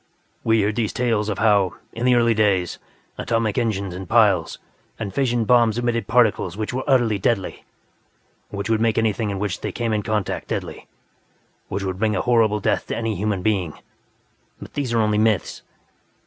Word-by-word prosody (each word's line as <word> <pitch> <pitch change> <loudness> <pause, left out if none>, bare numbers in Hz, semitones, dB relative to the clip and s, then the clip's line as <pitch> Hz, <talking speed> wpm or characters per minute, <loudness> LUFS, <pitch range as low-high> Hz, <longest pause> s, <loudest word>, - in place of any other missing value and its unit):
We 115 0 +3
hear 105 0 +2
these 110 -1 -1
tales 115 -4 0
of 100 - -2
how, 100 -4 +2 0.2
in 120 +2 -2
the 125 - +5
early 115 -1 +3
days, 100 -5 +1 0.4
atomic 115 -3 0
engines 100 -5 -2
and 95 +1 -8
piles 105 -8 +3 0.4
and 100 -4 -5
fission 120 -3 0
bombs 120 -2 +4
emitted 120 -1 -1
particles 110 -6 +2
which 110 +2 -3
were 130 +1 -2
utterly 120 -7 +2
deadly, 100 -1 -1 0.8
which 100 -1 -4
would 110 -1 +1
make 115 -2 +1
anything 110 -1 0
with 100 - -3
which 100 -1 -3
they - - -3
came 115 -2 -2
in 105 - 0
contact 105 -2 -2
deadly, - - -5 0.8
which 100 +1 -4
would 95 -1 -3
bring 110 -1 +1
a - - 0
horrible 115 -4 +2
death - - -1
to - - -3
any 115 -1 -1
human 100 -1 -2
being. 95 -7 0 0.9
But - - -11
these 140 -4 -2
are 115 - +1
only 105 -1 +1
myths. 110 -4 0
110 Hz, 180 wpm, -22 LUFS, 100-115 Hz, 0.9 s, the